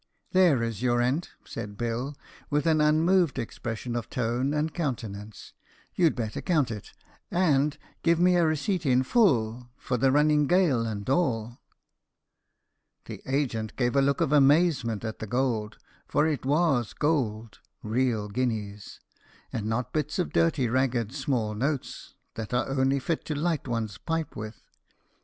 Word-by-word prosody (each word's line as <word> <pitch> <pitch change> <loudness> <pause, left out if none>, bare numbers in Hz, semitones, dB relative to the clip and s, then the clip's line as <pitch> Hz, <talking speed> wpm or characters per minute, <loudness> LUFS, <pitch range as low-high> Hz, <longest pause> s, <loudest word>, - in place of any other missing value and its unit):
"There 175 -10 +4
is 115 -2 -3
your 120 -1 +2
rent," 125 +8 0 0.2
said 105 -3 -7
Bill, 120 +5 -3 0.3
with 150 0 0
an 160 -2 +3
unmoved 160 +1 +3
expression 115 +1 -4
of 120 - -4
tone 125 +3 -1
and 150 +1 -1
countenance; 110 - -5 0.4
"you'd 170 -4 +3
better 110 -3 -3
count 150 -9 +1
it, 105 -3 -7 0.4
and 150 -5 +2 0.2
give 170 0 +3
me 180 +1 +4
a 175 - +4
receipt 160 +4 0
in 130 -3 +3
full 125 - +2
for 125 - -2
the 130 +3 +3
running 150 +1 +3
gale 155 -11 +3
and 100 -2 -5
all." 120 -6 0 1.5
The - - -8
agent 125 -6 -1
gave 120 0 0
a 140 - +5
look 140 +3 +1
of 155 -4 +1
amazement 140 - +3
at 110 - -5
the 110 - -5
gold; 115 -3 -1 0.3
for 150 - +2
it 150 -4 -1
was 145 -6 +2
gold 115 -8 -1 0.2
real 110 -1 0
guineas! 105 -3 -3 0.5
and 110 -2 -2
not 115 +3 -2
bits 150 -1 -1
of 180 - -2
dirty 160 -6 +2
ragged 120 -2 0
small 130 -6 -1
notes, 135 +5 -3 0.2
that 110 +2 -4
are 120 - +1
only 135 0 +1
fit 155 +4 -2
to 155 - -3
light 160 -1 -1
one's 110 -5 -3
pipe 165 -1 -3
with. 110 +1 -7
130 Hz, 150 wpm, -27 LUFS, 115-150 Hz, 1.5 s, a